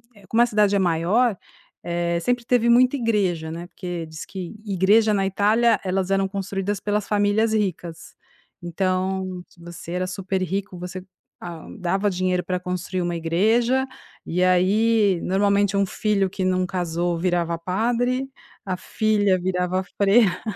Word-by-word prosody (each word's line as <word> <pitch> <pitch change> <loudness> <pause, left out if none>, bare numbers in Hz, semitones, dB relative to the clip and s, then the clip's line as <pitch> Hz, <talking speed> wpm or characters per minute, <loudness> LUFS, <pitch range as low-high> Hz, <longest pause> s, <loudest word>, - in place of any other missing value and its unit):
eh, 205 - -18
como 230 - +3
a - - +6
cidade 210 -3 +2
é - - +1
maior, 190 +6 +2 0.5
eh, 170 0 -1
sempre 245 +4 0
teve 235 -1 +2
muita 250 +3 +5
igreja, 195 - 0
né, 170 +2 -7
porque 175 -3 -6
diz 155 0 -8
que 185 +2 -7
igreja 205 +3 +3
na 195 -1 +1
Itália, 215 +3 +3
elas 190 0 -1
eram 195 0 +2
construídas 195 0 -3
pelas 210 +1 -1
famílias 210 +2 +2
ricas. 180 -6 -3 0.5
Então, 185 +1 -2
se - - -24
você 170 0 -9
era 185 0 -1
super 190 0 -3
rico 185 0 -3
você, 180 +1 -7 0.4
ah, 170 -2 -8
dava 195 +2 0
dinheiro 185 -1 0
pra 180 -1 -2
construir 180 +1 -3
uma 175 0 -2
igreja 220 +10 +2 0.4
e 180 +2 0
aí 200 +2 +3
normalmente 200 +1 +2
um 200 - +3
filho 195 0 0
que 190 - -3
não 185 0 +1
casou 175 -2 -2
virava 170 -1 0
padre, 240 +8 0 0.4
a 185 -2 -2
filha 205 -1 +1
virava 180 0 -1 0.2
freira. 200 -1 +4
190 Hz, 150 wpm, -23 LUFS, 180-210 Hz, 0.5 s, a